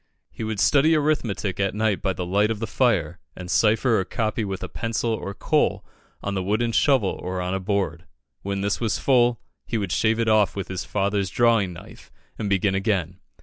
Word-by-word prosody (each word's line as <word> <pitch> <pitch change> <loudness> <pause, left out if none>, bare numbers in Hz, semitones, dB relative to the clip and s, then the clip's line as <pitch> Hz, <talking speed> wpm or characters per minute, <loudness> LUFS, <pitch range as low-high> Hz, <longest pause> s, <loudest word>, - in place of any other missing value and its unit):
He - - -7
would 110 -2 -3
study 150 +8 +4
arithmetic 120 -11 -1
at 95 -1 0
night 110 -2 0
by 95 - 0
the 90 0 -4
light 100 +4 +2
of 110 - -1
the 115 - -3
fire, 95 - 0 0.2
and 90 -1 -7
cipher 115 +1 +3
or - - 0
copy 110 +4 -2
with 95 -2 -4
a - - -3
pencil 115 0 -2
or 100 -3 -4
coal - - 0 0.4
on 100 - -2
the 95 - -1
wooden 110 +5 0
shovel 125 -5 +2
or 90 0 -3
on 90 +1 -2
a 95 - -1
board. 95 -3 -2 0.3
When 100 0 -3
this 100 0 -1
was 115 -3 0
full, 120 -3 +3 0.3
he 115 - -1
would 100 -5 -3
shave 110 +2 +2
it 115 - +1
off 110 -4 +3
with 100 - -5
his 95 -1 -4
father's 100 -1 -1
drawing 115 -5 +2
knife, - - -13 0.3
and 105 -3 -2
begin 100 0 +2
again. 95 -3 -1
100 Hz, 205 wpm, -24 LUFS, 95-115 Hz, 0.4 s, study